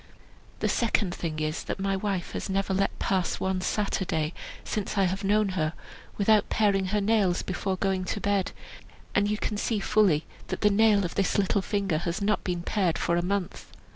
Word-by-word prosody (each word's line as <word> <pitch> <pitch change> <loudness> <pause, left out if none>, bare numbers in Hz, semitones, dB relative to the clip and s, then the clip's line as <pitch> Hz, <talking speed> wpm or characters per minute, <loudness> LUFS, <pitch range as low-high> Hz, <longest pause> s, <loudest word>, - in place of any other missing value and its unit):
The - - +2
second 215 -5 +1
thing 160 -3 -4
is, 155 +1 -2
that - - -4
my 195 0 0
wife 190 -3 -2
has - - -4
never 195 0 0
let 195 +1 0
pass 185 -3 0
one 190 -1 -1
Saturday 180 -5 -1 0.3
since 210 0 -3
I 195 - +4
have 190 +2 -1
known 205 +1 +3
her, 160 -4 -1 0.4
without 210 0 +3
paring 200 -3 +2
her 210 +3 +1
nails 200 -4 +2
before 190 +1 -2
going 190 -1 0
to 195 - -2
bed, 200 -2 0 0.6
and 205 0 +3
you 210 - 0
can 210 - -2
see 215 +1 0
fully 195 -7 +3 0.2
that - - -4
the 210 - +4
nail 205 -1 +4
of 170 - -4
this 195 - +1
little 200 0 +2
finger 195 -5 -1
has 170 +3 -2
not 210 +1 +1
been 175 -2 -2
pared 185 -4 +1
for 170 - +1
a 175 - +2
month. 190 0 -3
195 Hz, 195 wpm, -27 LUFS, 180-205 Hz, 0.6 s, I